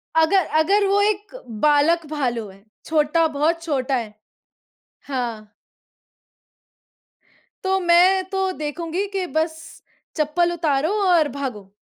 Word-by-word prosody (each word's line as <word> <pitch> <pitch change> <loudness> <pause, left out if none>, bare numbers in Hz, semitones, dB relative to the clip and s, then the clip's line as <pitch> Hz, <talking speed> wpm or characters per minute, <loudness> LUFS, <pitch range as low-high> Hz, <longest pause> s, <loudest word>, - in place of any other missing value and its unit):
अगर 325 +2 +4
अगर 400 +6 +3
वो 400 +1 +3
एक 420 +2 -1 0.3
बालक 305 +3 +3
भालू 240 -7 -2
है, 195 +1 -17 0.2
छोटा 315 +1 +2
बहुत 315 +3 0
छोटा 275 -4 -1
है 225 -4 -4 1.0
हाँ। 230 -5 -4 2.1
तो 380 0 +1
मैं 360 +2 +4
तो 385 -1 -1
देखूँगी 330 +5 -3
कि 375 - -1
बस 320 0 0 0.6
चप्पल 320 +3 +1
उतारो 310 -1 0 0.2
और 335 -4 +4
भागो। 245 -9 -6
320 Hz, 110 wpm, -22 LUFS, 280-360 Hz, 2.1 s, अगर